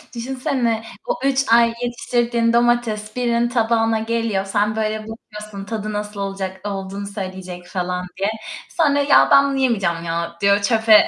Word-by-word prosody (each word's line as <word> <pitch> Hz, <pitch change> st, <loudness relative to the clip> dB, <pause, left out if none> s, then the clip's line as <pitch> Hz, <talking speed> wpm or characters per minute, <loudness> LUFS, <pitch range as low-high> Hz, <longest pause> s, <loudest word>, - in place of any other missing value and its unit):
Düşünsene, 240 Hz, -2 st, -1 dB, 0.2 s
o -, -, -1 dB
3 275 Hz, 0 st, +2 dB
ay 235 Hz, 0 st, +5 dB
yetiştirdiğin 240 Hz, -1 st, 0 dB
domates 235 Hz, -3 st, +1 dB
birinin 240 Hz, -1 st, +1 dB
tabağına 225 Hz, -2 st, +2 dB
geliyor. 225 Hz, -3 st, -1 dB
Sen 205 Hz, +2 st, 0 dB
böyle 215 Hz, 0 st, -1 dB
bakıyorsun 210 Hz, -2 st, -9 dB
tadı 215 Hz, 0 st, -4 dB
nasıl 210 Hz, 0 st, -4 dB
olacak 195 Hz, 0 st, -4 dB
olduğunu 195 Hz, 0 st, -4 dB
söyleyecek 185 Hz, -3 st, -7 dB
falan 180 Hz, -1 st, -3 dB
diye. 195 Hz, +2 st, +1 dB, 0.4 s
Sonra 290 Hz, -4 st, +2 dB
"Ya, 285 Hz, 0 st, +5 dB
ben 275 Hz, 0 st, +7 dB
bunu 275 Hz, -, -1 dB
yemeyeceğim 195 Hz, -10 st, +1 dB
ya" 170 Hz, 0 st, -3 dB
diyor 200 Hz, 0 st, +4 dB
çöpe 220 Hz, 0 st, +5 dB
215 Hz, 145 wpm, -21 LUFS, 195-235 Hz, 0.4 s, ben